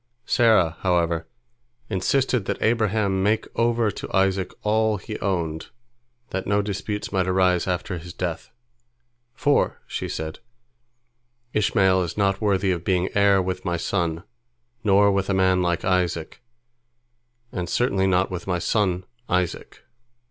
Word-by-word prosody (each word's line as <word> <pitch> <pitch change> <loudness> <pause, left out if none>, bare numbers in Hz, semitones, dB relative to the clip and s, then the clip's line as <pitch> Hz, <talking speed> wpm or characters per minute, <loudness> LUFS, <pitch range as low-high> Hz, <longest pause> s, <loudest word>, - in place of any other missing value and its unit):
Sarah, 105 -9 +3
however, 85 -3 0 0.6
insisted 120 +3 0
that - - -2
Abraham 110 -4 +1
make 105 +3 +1
over 115 -2 +2
to - - -8
Isaac 95 -1 +1
all 110 0 +2
he 105 +3 -7
owned, 85 -5 -2 0.6
that 95 0 -3
no 100 0 +2
disputes 105 +1 -4
might 95 -2 +1
arise 90 -1 +2
after 90 0 -2
his 85 +1 -9
death, 85 -1 -4 0.9
"for," 145 0 +1
she - - -4
said, 80 0 -5 1.1
"Ishmael 95 -3 +3
is 85 +1 -4
not 100 -1 +1
worthy 100 -2 +2
of 85 -2 -2
being 90 0 +1
heir 100 -2 +4
with 95 0 -3
my 85 -2 -1
son, 85 -2 -1 0.6
nor 100 -1 +5
with 100 0 0
a 100 - +2
man 95 -1 +3
like 85 -1 0
Isaac, 90 -3 -1 1.1
and 90 -3 -4
certainly 95 -6 +1
not 95 +1 +2
with 90 0 -5
my 90 -2 +1
son 95 0 0 0.3
Isaac." 90 -1 -2
95 Hz, 135 wpm, -24 LUFS, 90-100 Hz, 1.1 s, nor